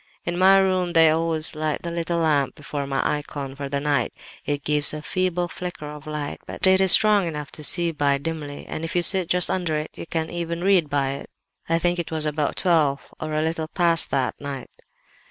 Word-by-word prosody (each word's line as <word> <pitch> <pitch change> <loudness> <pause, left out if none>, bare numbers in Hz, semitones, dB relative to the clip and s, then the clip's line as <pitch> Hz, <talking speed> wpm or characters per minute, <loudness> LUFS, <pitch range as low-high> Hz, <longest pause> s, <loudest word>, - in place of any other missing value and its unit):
In 175 - -2
my 190 +2 +6
room 185 -2 +1
they 165 -2 +6
always 160 0 +1
light 155 -1 -3
the 170 - -4
little 170 0 -2
lamp 150 -5 +1
before 145 -1 -5
my 135 -1 0
icon 145 -2 -4
for 140 0 -6
the 140 0 -1
night; 140 -4 0 0.3
it 145 -1 -2
gives 150 0 +1
a 150 - -7
feeble 180 0 -1
flicker 175 -2 -7
of 150 +1 -9
light, 150 -1 -4
but - - -2
it 190 0 +5
is 190 -1 +7
strong 210 -4 +6
enough 150 -2 -6
to 155 - -8
see 170 +2 +2
by 145 -3 +1
dimly, 145 -1 -6
and 155 - -6
if 165 - -4
you 175 - +2
sit 185 -2 +2
just 180 0 +2
under 175 -4 -1
it 150 +1 -6
you - - -8
can 160 -1 -2
even 170 0 -4
read 185 -6 +3
by 140 -1 0
it. 140 - -7 0.4
I 165 - +3
think 175 +1 0
it 170 - -3
was 155 -1 0
about 150 -1 -1
twelve 155 -6 +1
or 155 0 -4
a 155 - +1
little 160 0 -2
past 170 -1 +4
that 135 -2 0
night. 140 -3 -7
160 Hz, 220 wpm, -23 LUFS, 145-175 Hz, 0.4 s, is